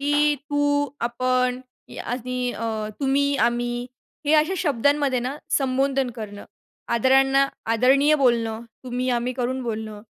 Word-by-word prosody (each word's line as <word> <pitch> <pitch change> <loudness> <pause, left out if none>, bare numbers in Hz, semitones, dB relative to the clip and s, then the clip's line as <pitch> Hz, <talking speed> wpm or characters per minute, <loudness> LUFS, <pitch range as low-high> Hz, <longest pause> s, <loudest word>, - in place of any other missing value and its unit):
की 295 +1 +3 0.2
तू, 290 0 +1
आपण 250 +1 0 0.4
आणि 250 0 -2
अ, 220 -1 -3
तुम्ही, 280 +1 +2
आम्ही 240 +1 0 0.4
हे 295 - +3
अशा 310 +5 +3
शब्दांमध्ये 285 -3 +1
ना 255 +4 -3 0.2
संबोधन 270 -1 0
करणं, 210 -3 -8 0.5
आदरांना 270 +3 +4 0.3
आदरणीय 275 +6 +4
बोलणं, 235 -4 +1 0.2
तुम्ही 250 0 -2
आम्ही 245 +1 0
करून 255 +1 -2
बोलणं, 215 -2 -5
255 Hz, 120 wpm, -23 LUFS, 240-280 Hz, 0.5 s, आदरांना